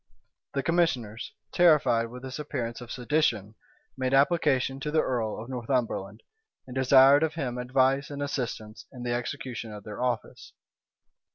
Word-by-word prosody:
The 140 - 0
commissioners, 130 -11 0 0.2
terrified 150 -9 +4
with 125 +2 -10
this 130 +2 -6
appearance 125 -6 -4
of 120 - -9
sedition, 120 -6 0 0.4
made 130 0 0
application 140 -3 +2
to 150 - -3
the 155 +1 +2
earl 115 -5 -2
of 115 - -8
Northumberland, 120 -5 -2 0.4
and 125 - -10
desired 135 +2 +6
of 160 -1 0
him 125 -6 -3
advice 130 +2 +1
and 145 -1 -6
assistance 115 -6 -5
in 125 -2 -9
the 120 -1 -1
execution 120 -2 -4
of 105 -1 -9
their 105 +1 -7
office. 125 -3 -3
130 Hz, 150 wpm, -27 LUFS, 115-140 Hz, 0.4 s, desired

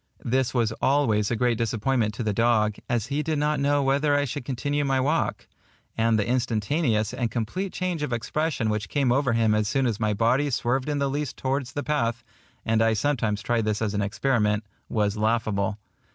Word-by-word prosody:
This 130 +1 +1
was 115 -3 +1
always 115 -7 +2
a 115 - 0
great 120 0 +1
disappointment 115 0 0
to 120 - -3
the 105 -1 0
dog, 110 -1 +2
as 120 -3 0
he 150 - +1
did 155 0 -1
not 150 0 +1
know 145 0 +2
whether 140 +2 +2
I 145 0 +2
should 135 0 -5
continue 145 +3 -1
my 135 -1 +1
walk; 150 +5 0 0.5
and 115 0 +2
the 105 - 0
instantaneous 120 -1 0
and 125 -2 -1
complete 130 - -3
change 180 -4 -2
of 150 - -2
expression 120 0 -1
which 105 -1 -3
came 140 -4 +1
over 130 -1 +2
him 115 -2 +3
as 105 -1 +1
soon 135 +5 +1
as 115 -3 -1
my 105 -2 0
body 125 +7 +2
swerved 130 +2 0
in 145 - 0
the 140 0 +1
least 145 0 -3
towards 130 -1 -2
the 145 - -3
path 120 -6 -1 0.4
(and 110 0 +2
I 115 0 +3
sometimes 110 -4 0
tried 120 -2 0
this 105 -1 0
as 110 -2 -1
an 105 - 0
experiment) 105 0 +1 0.3
was 105 -1 0
laughable. 105 -2 0
120 Hz, 200 wpm, -25 LUFS, 110-140 Hz, 0.5 s, him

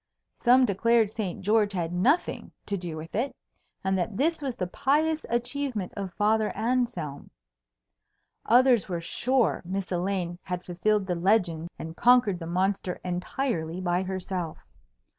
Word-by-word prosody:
Some 255 +1 +5
declared 225 +1 +2
Saint 205 -5 -4
George 210 +1 +2
had 175 -2 -2
nothing 255 - +1
to 200 - -1
do 175 -4 -5
with 160 +1 -8
it, 250 +6 -1 0.5
and 190 0 +1
that 195 +3 -2
this 320 +3 +1
was 265 -4 -3
the 180 - -2
pious 305 - +1
achievement 240 -4 -2
of 195 -2 -4
Father 215 +1 +2
Anselm. 220 - -1 1.2
Others 245 -2 +5
were 175 -2 -2
sure 245 +8 +1
Miss 190 +2 -4
Elaine 180 -1 -1
had 180 -1 -5
fulfilled 195 +3 +1
the 180 - -1
legend 170 -3 +1
and 160 0 -7
conquered 240 -6 +4
the 165 - -6
monster 185 +1 -1
entirely 180 -1 -2
by 180 -1 0
herself. 185 -3 -4
195 Hz, 140 wpm, -27 LUFS, 175-235 Hz, 1.2 s, Some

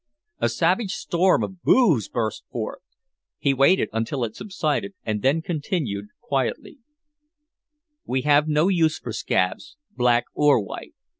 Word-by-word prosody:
A 120 - +1
savage 185 - +1
storm 180 +2 +2
of 185 -2 -6
"booh's" 170 - +3
burst 110 -3 -2
forth. 115 +7 -5 0.6
He 140 - +1
waited 140 +8 +4
until 115 +4 -2
it 110 -2 -4
subsided 190 0 -2
and 105 -2 -2
then 145 +7 +2
continued 145 - -3
quietly: 240 +3 -3 1.3
"We 130 0 -1
have 150 +1 +4
no 155 +2 +2
use 165 -5 +2
for 115 - -7
scabs, 110 - -1 0.2
black 120 -1 +3
or 150 -4 +4
white. 100 - -8
145 Hz, 135 wpm, -23 LUFS, 120-180 Hz, 1.3 s, waited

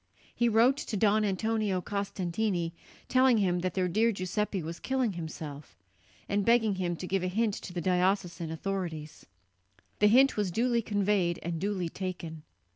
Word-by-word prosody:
He 240 0 +2
wrote 235 +5 +4
to 225 -7 -3
Don 215 +1 +3
Antonio 210 0 0
Costantini 190 -2 -2 0.4
telling 255 -2 +4
him 180 -4 +1
that 180 -1 -2
their 185 -1 +1
dear 220 +6 +2
Giuseppe 190 0 -2
was 165 +2 -6
killing 260 -5 0
himself, 155 -4 -7 0.5
and 200 0 0
begging 230 -1 +3
him 175 -2 -1
to 180 - -6
give 190 +1 0
a 185 - -1
hint 215 +3 0
to - - -8
the 175 -1 -3
diocesan 180 -1 0
authorities. 160 -2 -5 0.7
The 210 - +6
hint 265 +6 +5
was 205 -3 +1
duly 235 +5 +1
conveyed 205 -5 +1
and 170 -1 -3
duly 195 -3 -1
taken. 170 -3 -6
195 Hz, 160 wpm, -29 LUFS, 175-215 Hz, 0.7 s, The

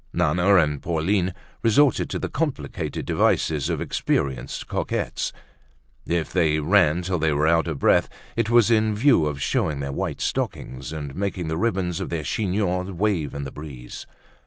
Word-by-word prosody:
Nana 90 +3 +3
and 75 -5 +2
Pauline 90 +3 0 0.3
resorted 125 +3 +3
to - - -2
the - - -3
complicated 135 - -3
devices 75 -4 +1
of - - -1
experienced 65 -3 -2
coquettes. - - -2 0.8
If 85 -2 -1
they 80 -4 +2
ran 85 0 +3
till 90 -1 -1
they 80 0 +2
were 75 +2 +1
out 85 +1 +3
of 80 -4 -2
breath, - - +3 0.3
it 115 -1 0
was 120 -1 +5
in 110 -1 +3
view 110 - +4
of 75 -2 -3
showing 70 +3 0
their 70 0 -3
white - - -3
stockings 65 0 -3
and 75 -3 -5
making 95 -3 -3
the 80 - -1
ribbons 95 -6 0
of - - -4
their 80 -2 -2
chignons 90 +1 -1
wave 90 -6 -1
in 70 - -4
the 65 - -6
breeze. 70 -5 -9
85 Hz, 165 wpm, -24 LUFS, 75-100 Hz, 0.8 s, was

